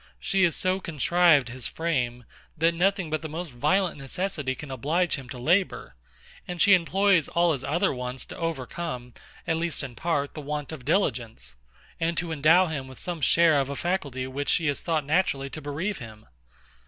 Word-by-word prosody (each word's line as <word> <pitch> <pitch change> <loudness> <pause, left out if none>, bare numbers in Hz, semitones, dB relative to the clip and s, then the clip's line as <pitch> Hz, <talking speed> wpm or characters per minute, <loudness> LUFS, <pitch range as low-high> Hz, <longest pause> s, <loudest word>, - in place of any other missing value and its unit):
She 195 -1 +2
has 170 - +1
so 185 +1 0
contrived 165 -3 +3
his 125 +1 -4
frame, 125 -7 -2 0.3
that 165 +2 +3
nothing 185 -1 +1
but 155 - -1
the 160 - -5
most 165 +1 -5
violent 180 +7 +1
necessity 140 -1 -3
can 145 +1 -9
oblige 155 +8 0
him 135 -4 -4
to 125 - -7
labour; 175 +10 +1 0.5
and 180 -1 -5
she 205 - +6
employs 185 -1 +3
all 170 0 +2
his 135 -3 -4
other 170 +7 +1
wants 125 0 -4
to - - -10
overcome, 135 -5 -4 0.3
at 160 - 0
least 165 -2 -2
in 130 -3 -6
part, 145 0 -1
the 155 - -6
want 150 0 -4
of 145 -6 -8
diligence, 130 - 0 0.5
and 165 +1 0
to 175 -2 -2
endow 160 +4 +5
him 145 -6 -4
with 130 - -12
some 175 -3 -3
share 165 0 +5
of 135 0 -1
a 140 - -3
faculty 145 -7 -2
of 130 0 -6
which 145 +1 -2
she 165 - +2
has 145 -2 0
thought 160 -3 0
fit - - -17
naturally 145 -5 +1
to 155 - -7
bereave 155 +8 -3
him. 110 -2 -11
155 Hz, 195 wpm, -26 LUFS, 135-175 Hz, 0.5 s, she